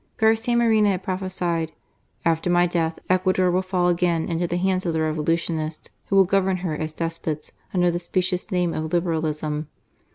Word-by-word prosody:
Garcia 225 +2 +3
Moreno 220 -3 +4
had 190 -1 -1
prophesied: 180 -4 -2 0.5
"After 165 +1 +1
my 175 0 +4
death, 165 -2 -1
Ecuador 185 0 +2
will 180 +1 +2
fall 185 -1 0
again 175 -2 +1
into 170 +1 0
the 175 - -1
hands 185 0 +1
of 170 - -1
the 160 - 0
Revolutionists, 155 0 -1 0.2
who 195 - 0
will 195 -1 +7
govern 190 0 +2
her 160 - -1
as 155 +1 -3
despots, 165 -1 -4 0.2
under 175 -2 +2
the 175 - -2
specious 180 +2 -1
name 180 -3 0
of 155 0 -3
Liberalism. 155 -3 -1
175 Hz, 170 wpm, -23 LUFS, 160-185 Hz, 0.5 s, will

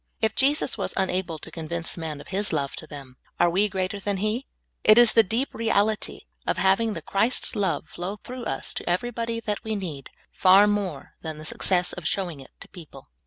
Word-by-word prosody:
If 220 0 +1
Jesus 275 0 +2
was - - -2
unable 185 -3 -1
to - - -8
convince 165 0 -3
men 160 -3 -5
of - - -12
His 200 +2 +1
love 140 -4 -1
to 155 - -9
them, 135 -4 -10 0.2
are 175 - +4
we 200 +4 +2
greater 190 +1 -2
than 200 0 -2
He? 215 +7 -2 0.4
It 215 +1 +7
is 240 -2 +9
the 225 - +7
deep 225 +7 -2
reality 220 -1 +1 0.3
of - - 0
having 195 +5 +2
the - - -6
Christ 220 +6 0
love 195 -6 -1
flow 180 +5 -5
through 245 +3 -8
us - - -3
to - - -4
everybody 230 +4 -1
that 210 -2 -3
we 220 -1 -2
need, 160 -9 -5 0.2
far 190 +2 +6
more 200 -8 -2
than 160 -1 -6
the 155 - -9
success 180 +2 +2
of 180 - -4
showing 175 -7 -1
it 135 - -12
to - - -10
people. 155 - -13
195 Hz, 205 wpm, -25 LUFS, 170-220 Hz, 0.4 s, is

